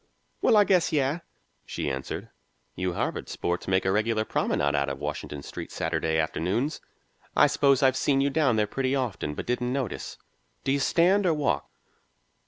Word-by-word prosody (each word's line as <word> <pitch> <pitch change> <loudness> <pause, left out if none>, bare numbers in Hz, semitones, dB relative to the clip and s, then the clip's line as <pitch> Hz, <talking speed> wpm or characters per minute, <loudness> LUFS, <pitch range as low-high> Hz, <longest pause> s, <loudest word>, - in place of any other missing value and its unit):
"Well, 220 - +5
I 205 - +7
guess 185 -4 +2
yes," 145 +2 +1 0.4
she - - -4
answered. 65 -1 -4 0.5
"You 90 0 -2
Harvard - - -3
sports 85 0 -2
make 95 0 +2
a 95 - +2
regular 110 +2 +1
promenade 70 -8 0
out 70 0 +1
o' 70 - -3
Washington 70 +1 -5
Street - - -7
Saturday 80 0 -1
afternoons. 95 - -1 0.5
I - - +7
suppose 140 -1 +3
I've 130 -1 +4
seen 135 0 +2
you 140 +1 +2
down 140 -6 +2
there 105 -1 +2
pretty 130 +5 -1
often, 115 - -2
but - - -5
didn't 125 0 -1
notice. 130 -7 -3 0.5
Do 135 - 0
you 140 - +2
stand 180 +7 +3
or 165 - +3
walk?" 150 -2 0
125 Hz, 175 wpm, -27 LUFS, 85-140 Hz, 0.5 s, I